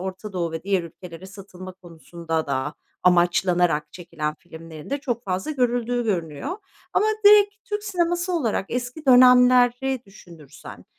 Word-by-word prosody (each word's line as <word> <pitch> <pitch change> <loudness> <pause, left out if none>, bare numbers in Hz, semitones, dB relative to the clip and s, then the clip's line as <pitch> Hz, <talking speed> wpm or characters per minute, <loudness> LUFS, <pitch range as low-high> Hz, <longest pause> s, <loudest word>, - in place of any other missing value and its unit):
Orta 190 +2 -7
Doğu 170 -3 -3
ve 160 - -5
diğer 195 -2 0
ülkelere 170 +1 -11
satılma 185 -1 -11
konusunda 170 -2 -6
da 140 +2 -3 0.3
amaçlanarak 175 -2 +2
çekilen 155 -4 -5
filmlerin 160 -1 -12
de 280 - -1
çok 240 -4 -4
fazla 190 +7 -3
görüldüğü 245 -3 -1
görünüyor. 180 - -3 0.4
Ama 425 - +2 0.2
direkt 410 0 +6
Türk 415 -2 -4
sineması 350 -1 -1
olarak 235 - -1
eski 250 +5 -5
dönemleri 250 0 +5
düşünürsen, 165 -8 -14
190 Hz, 130 wpm, -23 LUFS, 170-250 Hz, 0.4 s, direkt